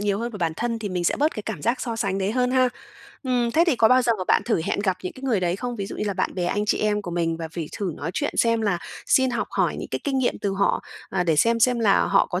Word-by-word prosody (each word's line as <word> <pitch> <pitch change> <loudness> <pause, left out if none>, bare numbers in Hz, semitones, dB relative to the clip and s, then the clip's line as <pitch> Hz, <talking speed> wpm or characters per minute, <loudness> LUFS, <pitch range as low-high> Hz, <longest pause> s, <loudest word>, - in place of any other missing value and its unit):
nhiều 205 -1 0
hơn 235 +2 -3
vào 210 - -8
bản 165 -3 0
thân, 230 -1 -2
thì 215 - -4
mình 180 -2 -2
sẽ - - +2
bớt 300 +3 +1
cái 215 - -5
cảm 205 -9 -5
giác 235 +4 0
so 230 -3 -3
sánh 195 -3 -1
đấy 195 +2 -1
hơn 250 +1 +1
ha. 255 0 +4 0.5
Ừm, 250 -3 +1
thế 330 +8 +4
thì 305 -8 +2
có 225 - +5
bao 255 +1 +5
giờ 235 -1 +3
mà 185 - -3
bạn - - +4
thử 225 -8 +1
hẹn - - -1
gặp 190 -3 0
những 185 - -4
cái 260 - -14
người 240 -8 +1
đấy 175 +1 0
không? 245 +2 -4
Ví 200 - -3
dụ - - -7
như - - -2
là 200 - -1
bạn - - -1
bè, 180 - -1
anh 205 +4 0
chị - - +1
em 210 -1 0
của 180 - -6
mình, 165 -1 -1
và 165 -1 -5
phỉ 165 -1 -5
thử 190 -5 -2
nói 160 - -4
chuyện 290 - -1
xem 230 -1 +3
là 200 -5 0 0.3
xin 260 -1 +3
học 240 - -2
hỏi - - 0
những - - -6
cái - - -2
kinh 275 -2 0
nghiệm 255 - 0
từ 200 - -1
họ, 195 +1 +1 0.3
à, 180 -2 0
để 165 -3 +2
xem 230 +7 +3
xem 245 +1 +4
là 205 -3 +4
họ - - +3
có 180 0 -2
210 Hz, 325 wpm, -24 LUFS, 185-240 Hz, 0.5 s, có